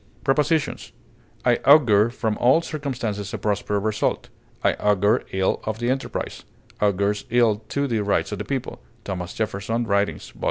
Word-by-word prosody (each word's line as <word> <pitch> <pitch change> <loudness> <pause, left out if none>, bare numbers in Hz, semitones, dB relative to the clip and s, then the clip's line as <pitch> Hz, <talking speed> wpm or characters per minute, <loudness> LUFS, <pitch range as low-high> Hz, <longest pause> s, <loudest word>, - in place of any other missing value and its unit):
Prepositions: 150 +2 0 0.5
I - - +4
augur 120 -7 +5
from 110 -3 -2
all 130 +7 +4
circumstances 120 - -4
a - - -3
prosperous 105 -1 -1
result; 110 -1 -1 0.3
I - - +4
augur 105 +3 +2
ill 95 0 0
of 110 0 -3
the 120 +2 0
enterprise; 130 - -4 0.4
"augurs 100 0 +1
ill 115 -3 +3
to 140 0 0
the 115 -5 0
rights 100 +1 0
of 105 - -4
the - - -2
people," 135 - -4 0.2
THOMAS 90 -2 -5
JEFFERSON 110 +2 -2
Writings 100 -1 0
vol. - - -20
110 Hz, 155 wpm, -23 LUFS, 100-125 Hz, 0.5 s, augur